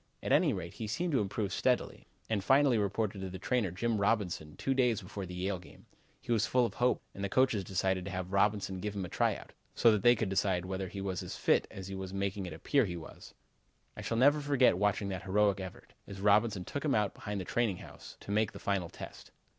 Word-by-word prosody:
At - - -2
any - - +5
rate, 85 -2 -5
he 110 - -5
seemed 170 +11 -1
to 135 - +3
improve 100 0 -2
steadily, - - 0 0.2
and 105 -3 -1
finally 135 -1 +4
reported 100 0 -1
to 95 - -4
the 95 - -6
trainer, 110 +1 0
Jim 110 +5 -1
Robinson, 95 -8 0
two 135 - 0
days 125 -4 +2
before 100 -1 -7
the 90 - -7
Yale 95 +1 -2
game. - - -16 0.3
He - - -6
was 110 -1 +2
full 125 -1 +3
of - - -4
hope 125 +1 +2
and 100 - -6
the 100 - -1
coaches 130 -5 +2
decided 95 -1 0
to - - -4
have 95 0 -4
Robinson 100 -1 +1
give 105 +2 -4
him 95 -2 -2
a - - -8
try - - +1
out, - - -11 0.2
so 115 - +6
that 105 -2 +1
they 120 +3 +6
could 110 -3 -1
decide 95 -2 +1
whether 95 0 -3
he 95 +2 -6
was 95 -2 -2
as - - -6
fit - - +2
as 95 -1 -8
he 95 - -6
was 95 0 -5
making 100 -1 -2
it 85 - -6
appear 125 - +2
he 90 -3 -4
was. 80 - -11 0.6
I - - -7
shall 115 - -2
never 145 +4 +5
forget 135 -9 +3
watching 100 0 +1
that 95 -1 -4
heroic 100 0 +2
effort, 95 -2 -9
as 100 -1 -8
Robinson 105 -1 +3
took 145 - -4
him 150 - +2
out 105 -2 +1
behind 105 -1 -5
the 95 - -5
training 115 -4 0
house, - - -12
to - - -7
make 105 0 +1
the - - -8
final 95 -4 -1
test. - - -10
100 Hz, 240 wpm, -32 LUFS, 95-115 Hz, 0.6 s, so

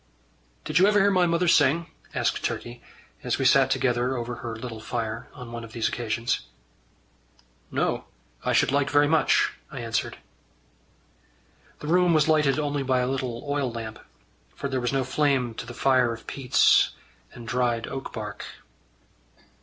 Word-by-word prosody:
"Did 155 +2 +2
you 190 - +6
ever 210 0 +4
hear 200 0 +4
my 180 -2 +3
mother 170 +1 +1
sing?" 165 +1 +4 0.3
asked - - 0
Turkey, 120 0 -4 0.4
as - - 0
we - - -1
sat - - +5
together 125 +1 +1
over 120 0 -4
her 115 -1 -6
little 115 -1 -7
fire, 115 +1 -4
on 125 -4 -9
one 115 0 -6
of 115 0 -11
these 115 -2 0
occasions. 115 0 -1 1.3
"No. - - -1 0.4
I - - 0
should - - +3
like 140 0 +1
very 145 0 +4
much," 155 -2 +3 0.2
I 135 - -7
answered. 115 -1 -2 1.6
The 150 - -6
room 175 0 +4
was 155 - +3
lighted 155 -3 +3
only 145 -1 -1
by 130 -1 +1
a 125 - 0
little 130 -3 -3
oil 140 -3 -1
lamp, 115 -1 -7 0.6
for 140 - -4
there 130 -2 -2
was 120 - 0
no 135 -1 +1
flame 130 -3 +1
to 115 - -7
the 120 - -8
fire 130 -3 +3
of 115 0 -8
peats 130 -2 +3 0.4
and 120 -2 -10
dried 120 -1 0
oak 135 - -6
bark. - - -6
130 Hz, 165 wpm, -25 LUFS, 120-145 Hz, 1.6 s, you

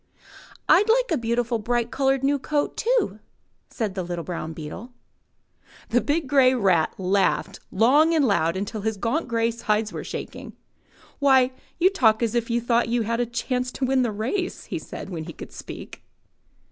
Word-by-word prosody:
*'rd 420 +3 +5
like - - +3
a - - +3
beautiful, 235 -1 -1
bright 240 +2 -1
coloured, 270 -1 +1
new 280 +1 +2
coat, 290 +2 -1
too," 450 - 0 0.5
said 215 -5 -3
the 190 - -3
little 175 -1 -4
brown 165 -2 -5
beetle. 165 +10 -8 1.0
The 245 +1 +3
big 305 +2 0
grey 260 -2 +5
rat 185 -9 +2
laughed 190 0 0
long 290 - +4
and 300 -3 +3
loud 170 -6 +1
until 205 +2 -4
his 220 0 -2
gaunt 235 +11 -1
grey 230 0 +1
sides 215 -2 -1
were - - -5
shaking. - - -7 0.7
*'Why, 265 -3 +4 0.3
you 365 +3 +4
talk 225 - +4
just 230 -2 +1
as - - -10
if 235 0 0
you 235 0 +1
thought 235 0 +1
you 235 0 +1
had 230 +2 -1
a 245 - 0
chance 250 +1 -2
to 265 - -1
win 260 0 +2
the 240 -3 0
race," 245 - -3
he - - -4
said, - - -8
when 160 -3 -5
he 165 - -8
could - - -10
speak. - - -9
235 Hz, 185 wpm, -24 LUFS, 210-270 Hz, 1.0 s, rd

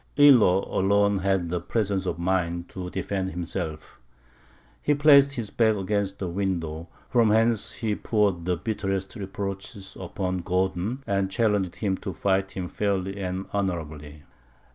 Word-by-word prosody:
Illo 120 -10 +6
alone 100 +1 +3
had 95 -3 0
the 90 0 -2
presence 100 -4 -1
of - - -2
mind 85 -1 -1
to 90 -1 -6
defend 95 +1 -2
himself. 85 -3 -5 0.8
He 145 - +2
placed 140 -1 +6
his 115 -6 -4
back 110 -2 +3
against 100 0 -1
a - - -1
window, 85 -3 -3 0.2
from 120 -3 +3
whence 110 0 +2
he 110 -3 -2
poured 100 -6 0
the 90 -1 0
bitterest 95 -2 -3
reproaches 100 0 -6
upon 95 0 -3
Gordon, 95 +7 -1
and 95 -1 0
challenged 100 -4 +1
him 95 +1 -1
to 95 - -5
fight 95 +3 +1
him 90 -2 -4
fairly 100 0 -2
and 95 0 -3
honourably. 80 -7 -3
95 Hz, 140 wpm, -26 LUFS, 90-105 Hz, 0.8 s, Illo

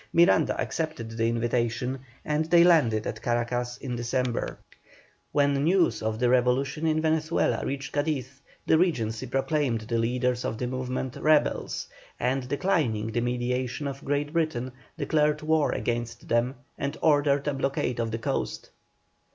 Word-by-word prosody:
Miranda 170 +2 +4
accepted 155 -9 -3
the 115 0 0
invitation, 120 +2 -1 0.3
and 150 +1 0
they 170 +1 +6
landed 140 -12 +4
at 110 - -4
Caracas 120 +1 -1
in 125 -3 -5
December. 120 +1 -1 0.7
When 145 -1 +3
news 175 +2 +3
of 110 0 -1
the 125 +2 +2
revolution 130 +5 +2
in 155 0 +1
Venezuela 160 +1 +1
reached 135 0 -4
Cadiz, 140 -3 -2 0.2
the 160 - +4
Regency 125 -9 0
proclaimed 135 -2 0
the 115 +1 -1
leaders 125 +1 0
of 110 - -2
the 125 - -2
movement 130 0 -3
rebels, 155 -1 +1 0.3
and, 125 0 -1
declining 140 - 0
the 120 - 0
mediation 125 +3 -1
of 135 0 -6
Great 145 +1 -1
Britain, 155 -7 -1 0.3
declared 150 -1 +1
war 155 -1 +2
against 120 -1 -3
them, 120 +3 +1 0.2
and 140 0 -2
ordered 145 -2 +3
a 145 - +1
blockade 135 -3 -1
of 115 -1 0
the 115 - -2
coast. 115 - -3
130 Hz, 145 wpm, -27 LUFS, 120-150 Hz, 0.7 s, they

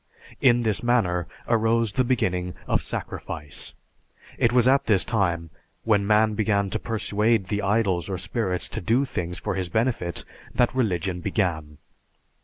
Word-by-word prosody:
In 120 -2 +5
this 110 -3 +1
manner 95 -8 +1 0.2
arose 115 -1 +2
the 130 - +2
beginning 90 -8 0
of - - +1
"sacrifice." 75 -2 -5 0.6
It 120 - +3
was 125 0 +4
at 135 +1 +4
this 100 -4 +3
time, 85 -7 -1 0.3
when 105 -3 +2
man 110 0 +4
began 100 -2 +1
to 110 - 0
persuade 110 -2 0
the 105 -1 0
idols 100 -3 +1
or 95 - -2
spirits 95 0 -2
to - - -4
do 120 +9 +2
things 90 -8 -4
for - - -3
his 90 -2 -2
benefit 110 -4 -1 0.3
that 120 - +3
religion 95 -7 0
began. 80 -7 -1
105 Hz, 150 wpm, -25 LUFS, 90-115 Hz, 0.6 s, In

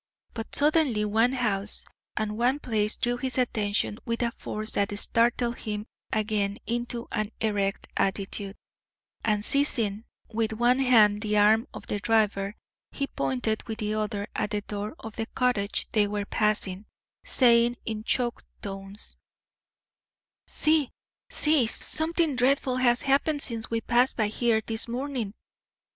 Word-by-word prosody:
But 225 -1 -6
suddenly 290 -8 +2
one 225 +4 +2
house 215 -5 +3 0.3
and 215 -1 -1
one 245 +5 +2
place 215 -6 -1
drew 245 -1 0
his 260 +1 -3
attention 210 -3 0
with 230 0 -2
a 235 - 0
force 215 -1 -4
that 200 0 -1
startled 235 +2 +1
him 210 -1 -4 0.3
again 210 -2 0
into 240 0 -3
an 215 0 -2
erect 200 -2 -1
attitude, 195 +1 -2 0.7
and 210 -1 +1
seizing 230 -7 +1 0.2
with 225 -1 -1
one 240 +3 +2
hand 215 -6 +5
the 210 -1 0
arm 220 +4 +4
of - - -9
the 205 - -2
driver, 210 -2 +1 0.4
he 280 - -2
pointed 140 - -1
with 220 -1 -4
the 215 -1 -2
other 210 -1 -2
at 210 - -1
the 210 -1 -2
door 205 +4 -5
of 225 -1 -10
the 225 -1 -3
cottage 215 -6 -1
they 210 -2 +3
were 205 0 -3
passing, 210 -2 0 0.4
saying 240 -1 +4
in 215 -1 -4
choked 240 +1 0 0.2
tones: 195 0 -1 1.3
"See! 305 -3 +3 0.4
see! 300 -6 +3
Something 320 +4 0
dreadful 255 0 +2
has 245 -1 +2
happened 285 +2 +2
since 230 -2 -2
we 230 0 -1
passed 245 +3 +2
by 215 -3 +1
here 220 0 +1
this 225 +1 0
morning. 245 -4 -4
225 Hz, 145 wpm, -27 LUFS, 210-245 Hz, 1.3 s, hand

